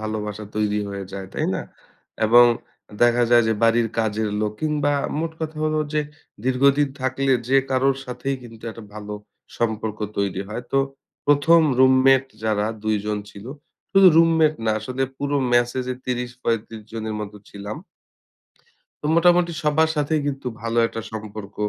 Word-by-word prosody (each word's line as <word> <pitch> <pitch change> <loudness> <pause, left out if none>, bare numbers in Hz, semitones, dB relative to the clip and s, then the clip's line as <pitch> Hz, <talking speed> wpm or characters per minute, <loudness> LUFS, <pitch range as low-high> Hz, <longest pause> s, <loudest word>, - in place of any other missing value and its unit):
ভালোবাসা 105 -1 -4
তৈরি 105 -1 +1
হয়ে 100 -1 -5
যায়, 95 -1 -6
তাই - - -1
না? - - -2 0.7
এবং 120 +2 +8 0.6
দেখা 120 0 +4
যায় 120 -1 +6
যে - - +3
বাড়ির 115 0 +3
কাজের 110 -1 0
লোক 105 -1 -1
কিংবা 150 -2 +1 0.3
মোট 165 +1 -2
কথা 160 -1 -4
হলো 155 0 +1
যে, 155 - +2 0.4
দীর্ঘদিন 140 +3 +3
থাকলে 130 +1 0 0.2
যে 135 - +4
কারোর 135 +1 +2
সাথেই 125 +2 -3
কিন্তু 115 -2 -13
একটা 115 0 -11
ভালো 105 0 -7 0.5
সম্পর্ক 110 -2 -2 0.2
তৈরি 100 -2 -1
হয়। 110 +3 -5
তো 135 - +4 0.5
১ম 145 +4 +5 0.2
রুমমেট 130 0 +5 0.2
যারা 105 -1 +1 0.2
২ 110 0 +1
জন 105 -1 -1
ছিল, 100 +1 -12 0.5
শুধু 195 -1 +7
রুমমেট 165 -2 +5
না 110 - +2
আসলে 130 +4 -3
পুরো 145 +1 -1 0.2
মেসে 120 +1 +2
যে 130 - -1
৩০-৩৫ 120 -3 -3
জনের 110 -1 -4
মত 105 -1 -6 0.2
ছিলাম। 100 +1 -7 1.3
তো - - 0
মোটামুটি 175 0 +4
সবার 155 +2 +3
সাথেই 150 +1 +1
কিন্তু 135 -2 -4 0.2
ভালো 115 0 -1
একটা 115 - -6
সম্পর্ক। 105 -2 -7
120 Hz, 150 wpm, -22 LUFS, 110-140 Hz, 1.3 s, এবং